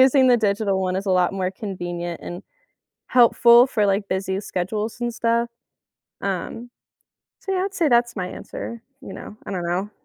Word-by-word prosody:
using 265 Hz, 0 st, +6 dB
the 245 Hz, -, +6 dB
digital 200 Hz, -2 st, +1 dB
one 185 Hz, -1 st, -1 dB
is 195 Hz, +2 st, -3 dB
a -, -, +1 dB
lot 180 Hz, +1 st, +3 dB
more 185 Hz, -1 st, -1 dB
convenient 175 Hz, -4 st, -5 dB
and 175 Hz, +3 st, -7 dB, 0.7 s
helpful 240 Hz, 0 st, +6 dB
for 215 Hz, -5 st, +1 dB
like, 200 Hz, +1 st, +1 dB
busy 190 Hz, 0 st, -1 dB
schedules 210 Hz, +4 st, -3 dB
and 240 Hz, 0 st, -1 dB
stuff. 235 Hz, +1 st, +1 dB, 0.7 s
Um, 200 Hz, +5 st, -4 dB, 0.7 s
so, 390 Hz, -, -4 dB
yeah, 370 Hz, -1 st, +1 dB
I'd 395 Hz, -, -8 dB
say 335 Hz, -5 st, +2 dB
that's 240 Hz, -2 st, +2 dB
my 185 Hz, -2 st, -2 dB
answer, 235 Hz, +4 st, -7 dB, 0.2 s
you -, -, -8 dB
know? 210 Hz, -, -9 dB
I -, -, -5 dB
don't 180 Hz, -2 st, -2 dB
know, 185 Hz, +4 st, -1 dB
205 Hz, 180 wpm, -23 LUFS, 185-235 Hz, 0.7 s, using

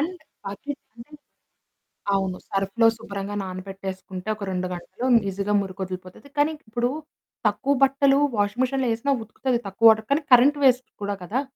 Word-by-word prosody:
And 355 Hz, +4 st, -2 dB, 0.3 s
బకెటంటే 235 Hz, +4 st, -8 dB, 1.0 s
అవును. 190 Hz, -2 st, -1 dB
సర్ఫులో 195 Hz, +4 st, +2 dB
శుభ్రంగా 200 Hz, -1 st, -5 dB
నానబెట్టేసుకుంటే 190 Hz, 0 st, -6 dB
ఒక 210 Hz, -, -8 dB
2 185 Hz, 0 st, -1 dB
గంటలు, 180 Hz, +7 st, -6 dB, 0.2 s
ఈజీగా 200 Hz, +2 st, -2 dB
మురికొదిలిపోతది. 185 Hz, +4 st, -7 dB
కానీ 295 Hz, +2 st, +3 dB, 0.2 s
ఇప్పుడు 240 Hz, +2 st, 0 dB, 0.6 s
తక్కువ 275 Hz, +1 st, +1 dB
బట్టలు 275 Hz, 0 st, +4 dB, 0.2 s
వాషింగ్ 205 Hz, +4 st, +1 dB
మిషిన్‌లో 265 Hz, 0 st, 0 dB
ఏసినా 235 Hz, +5 st, -1 dB
ఉతుకుతది, 245 Hz, +3 st, -1 dB
తక్కువ 195 Hz, +4 st, +4 dB
వాటర్ 220 Hz, 0 st, +3 dB
కానీ, 300 Hz, -, +1 dB
కరెంట్ 275 Hz, +4 st, +6 dB
వేస్ట్ 255 Hz, -1 st, +4 dB
కూడా 200 Hz, 0 st, -2 dB
కదా! 225 Hz, +9 st, -1 dB
215 Hz, 135 wpm, -24 LUFS, 195-260 Hz, 1.0 s, కరెంట్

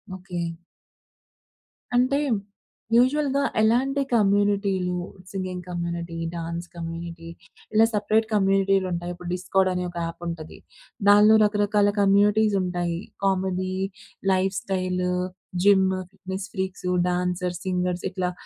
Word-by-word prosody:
Okay. 180 Hz, -2 st, -5 dB, 1.5 s
అంటే 255 Hz, +3 st, +3 dB, 0.8 s
యూజువల్‌గా 280 Hz, +3 st, +3 dB, 0.2 s
ఎలాంటి 260 Hz, +6 st, +2 dB
కమ్యూనిటీలు 200 Hz, -3 st, +2 dB, 0.4 s
సింగింగ్ 185 Hz, -2 st, -4 dB
కమ్యూనిటీ, 170 Hz, -1 st, -4 dB, 0.2 s
డాన్స్ 170 Hz, +1 st, -4 dB
కమ్యూనిటీ, 165 Hz, 0 st, -6 dB, 0.4 s
ఇలా 220 Hz, +1 st, +6 dB
సెపరేట్ 215 Hz, +2 st, +2 dB
కమ్యూనిటీలుంటాయి. 195 Hz, -3 st, +1 dB
ఇప్పుడు 175 Hz, 0 st, -8 dB
డిస్కార్డ్ 185 Hz, +1 st, +1 dB
అనే 180 Hz, 0 st, -2 dB
ఒక 175 Hz, -, -9 dB
యాప్ 165 Hz, +1 st, -7 dB
ఉంటది. 160 Hz, -2 st, -6 dB, 0.5 s
దానిలో 210 Hz, +2 st, +7 dB
రకరకాల 205 Hz, 0 st, +2 dB
కమ్యూనిటీస్ 205 Hz, +1 st, +4 dB
ఉంటాయి. 175 Hz, -2 st, -2 dB, 0.3 s
Comedy, 185 Hz, -1 st, 0 dB, 0.6 s
life 190 Hz, +1 st, +1 dB
style, 180 Hz, -1 st, -1 dB, 0.5 s
gym, 190 Hz, -2 st, +4 dB
fitness 190 Hz, 0 st, -6 dB
freaks, 190 Hz, -1 st, -3 dB, 0.2 s
dancers, 180 Hz, 0 st, -2 dB
singers 180 Hz, -1 st, -1 dB
ఇట్లా 180 Hz, -1 st, -1 dB
185 Hz, 100 wpm, -25 LUFS, 180-205 Hz, 1.5 s, దానిలో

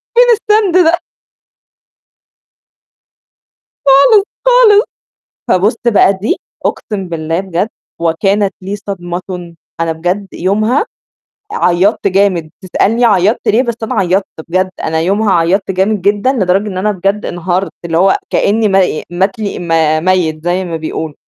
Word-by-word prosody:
فين -, -, +7 dB
السند 420 Hz, -4 st, +1 dB
ده؟ 335 Hz, +2 st, +3 dB, 2.9 s
خالص، 335 Hz, -, +6 dB
خالص -, -, -25 dB, 1.2 s
فبُصّ 205 Hz, +5 st, +2 dB, 0.2 s
بقى 200 Hz, -1 st, +5 dB
دي 210 Hz, -, -1 dB, 0.3 s
أقسم 195 Hz, -4 st, -3 dB
بالله 165 Hz, +1 st, -2 dB
بجد 190 Hz, +2 st, -2 dB, 0.3 s
وكانت 195 Hz, +5 st, 0 dB
لي 195 Hz, +2 st, -4 dB
صدمةٌ، 180 Hz, -2 st, -6 dB, 0.3 s
أنا 165 Hz, -1 st, 0 dB
بجد 180 Hz, +5 st, -2 dB
يومها 215 Hz, -, 0 dB, 0.7 s
عيّطت 195 Hz, -, +1 dB
جامد، 185 Hz, -5 st, +1 dB
تسألني 225 Hz, +6 st, +1 dB
عيّطت 205 Hz, 0 st, +2 dB
ليه، 230 Hz, +5 st, +3 dB
بس 235 Hz, -3 st, -2 dB
أنا 225 Hz, -, -3 dB
عيّطت 190 Hz, +1 st, +1 dB, 0.2 s
بجد، 185 Hz, +2 st, 0 dB
أنا 160 Hz, 0 st, -1 dB
يومها 200 Hz, +4 st, +1 dB
عيّطت 180 Hz, +4 st, +1 dB
جامد 190 Hz, +1 st, 0 dB
جدًا، 205 Hz, +6 st, +1 dB
لدرجة 195 Hz, -2 st, 0 dB
إن 185 Hz, -2 st, -5 dB
أنا 210 Hz, +2 st, 0 dB
بجد 195 Hz, +3 st, -2 dB
انهارت، 175 Hz, +2 st, -2 dB
اللي 165 Hz, -1 st, -1 dB
هو 190 Hz, +1 st, +4 dB
كأني 215 Hz, +1 st, +1 dB
م -, -, -2 dB, 0.4 s
مات 190 Hz, +6 st, -1 dB
لي 210 Hz, -2 st, -4 dB
م 175 Hz, -, -7 dB, 0.4 s
ميت 170 Hz, -4 st, 0 dB
زي 180 Hz, +2 st, 0 dB
ما 165 Hz, -2 st, -4 dB
بيقولوا، 160 Hz, -1 st, -5 dB
195 Hz, 135 wpm, -13 LUFS, 175-210 Hz, 2.9 s, فين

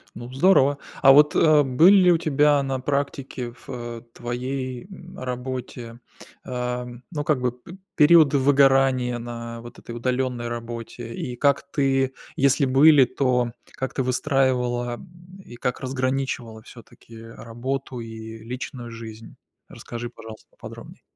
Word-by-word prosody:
Ну 120 Hz, +1 st, -9 dB
здорово. 145 Hz, -2 st, +4 dB, 0.2 s
А 135 Hz, -, +8 dB
вот, 150 Hz, +2 st, +6 dB
э, 155 Hz, -2 st, +5 dB
были 155 Hz, +9 st, +5 dB
ли 185 Hz, -2 st, +6 dB
у 170 Hz, -, +4 dB
тебя 150 Hz, -2 st, +3 dB
на 135 Hz, -1 st, -2 dB
практике 135 Hz, -2 st, -3 dB
в, 120 Hz, -, -20 dB
э, 120 Hz, -1 st, -6 dB
твоей, 125 Hz, +1 st, -5 dB
м, 180 Hz, -1 st, -12 dB
работе, 125 Hz, -2 st, -6 dB, 0.5 s
э, 125 Hz, -1 st, -3 dB, 0.3 s
ну, 150 Hz, -4 st, -3 dB
как 145 Hz, -3 st, 0 dB
бы, 125 Hz, -1 st, +1 dB
п 125 Hz, +10 st, -14 dB, 0.2 s
периоды 155 Hz, -2 st, +6 dB
выгорания 135 Hz, -2 st, +3 dB
на 115 Hz, 0 st, -7 dB
вот 120 Hz, +1 st, -12 dB
этой 115 Hz, -, -9 dB
удаленной 125 Hz, 0 st, -2 dB
работе? 115 Hz, 0 st, -7 dB
И 125 Hz, +1 st, -5 dB
как 140 Hz, +2 st, +2 dB
ты 135 Hz, -2 st, +1 dB, 0.2 s
если 140 Hz, +1 st, +3 dB
были, 135 Hz, +1 st, +6 dB
то 125 Hz, -2 st, 0 dB, 0.2 s
как 130 Hz, -, -5 dB
ты -, -, -1 dB
выстраивала, 125 Hz, -2 st, 0 dB
э, 180 Hz, +3 st, -16 dB
и 120 Hz, -, -12 dB
как 125 Hz, +1 st, -3 dB
разграничивала 130 Hz, -3 st, -3 dB
всё-таки 115 Hz, -1 st, -15 dB
работу 120 Hz, +3 st, -6 dB
и 110 Hz, -1 st, -8 dB
личную 125 Hz, 0 st, -7 dB
жизнь? 115 Hz, -1 st, -10 dB, 0.3 s
Расскажи, 120 Hz, 0 st, -7 dB
пожалуйста, 110 Hz, -2 st, -12 dB
поподробней. -, -, -12 dB
130 Hz, 140 wpm, -23 LUFS, 120-140 Hz, 0.5 s, А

